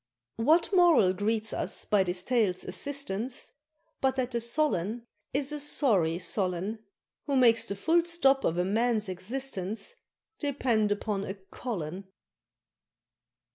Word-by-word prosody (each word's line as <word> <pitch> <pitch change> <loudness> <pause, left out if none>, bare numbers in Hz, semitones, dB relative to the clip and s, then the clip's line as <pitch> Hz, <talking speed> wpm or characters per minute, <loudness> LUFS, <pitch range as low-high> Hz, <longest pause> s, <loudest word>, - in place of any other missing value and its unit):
What 315 - +3
moral 330 - +5
greets 215 +2 -1
us - - -3
by 205 -2 +3
this 180 -1 -1
tale's 215 -7 +1
assistance 265 -4 -3 0.5
But 265 -1 +2
that 255 -1 -1
the 235 -1 -1
Solon 235 - 0 0.3
is 280 +1 0
a 300 - -3
sorry 210 - +2
Solon, 185 +3 -2 0.5
Who 280 - 0
makes 235 -3 +5
the 200 - -4
full 330 - +2
stop 275 -6 +2
of 165 - 0
a 180 - +1
Man's 220 +1 +1
existence 210 - -4 0.5
Depend 245 -7 +1
upon 205 -1 -1
a 190 - -5
Colon? 190 -3 -6
225 Hz, 130 wpm, -29 LUFS, 190-270 Hz, 0.5 s, moral